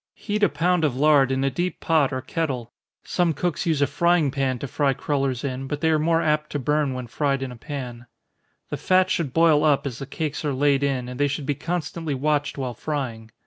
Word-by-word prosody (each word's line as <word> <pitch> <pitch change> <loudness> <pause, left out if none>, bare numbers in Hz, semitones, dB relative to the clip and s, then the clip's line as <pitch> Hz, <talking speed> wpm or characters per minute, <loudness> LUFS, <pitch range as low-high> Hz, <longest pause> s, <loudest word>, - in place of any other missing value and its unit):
Heat 210 -1 -3
a 205 - +5
pound 180 0 +1
of 145 -5 +1
lard 140 -1 +4
in 135 0 0
a 135 - +1
deep 175 +7 -2
pot 155 -5 +2
or 130 - -2
kettle, 130 -9 -3 0.3
(some 175 -3 +1
cooks 175 +3 -2
use 155 -4 +2
a - - +5
frying 160 +1 +2
pan 135 -2 0
to 140 - -5
fry 140 0 +1
crollers 135 -2 -1
in, 135 -1 -3
but 145 +1 -3
they 160 - +3
are 155 - +3
more 165 +1 +2
apt 150 0 +1
to - - 0
burn 145 0 0
when 125 -1 -4
fried 135 +2 -1
in 130 - -5
a - - -8
pan.) 125 -2 -7 0.6
The - - -3
fat 185 0 +3
should 155 -6 0
boil 160 0 +4
up, 145 -3 +3
as 130 -2 -4
the 135 - -6
cakes 155 +1 -3
are 145 -2 0
laid 140 +1 +2
in, 135 -3 -1
and 125 +1 -7
they 145 - +3
should 140 0 -3
be 145 - 0
constantly 165 -1 -3
watched 145 +2 0
while 130 -3 -3
frying. 120 -4 -4
145 Hz, 230 wpm, -24 LUFS, 130-160 Hz, 0.6 s, a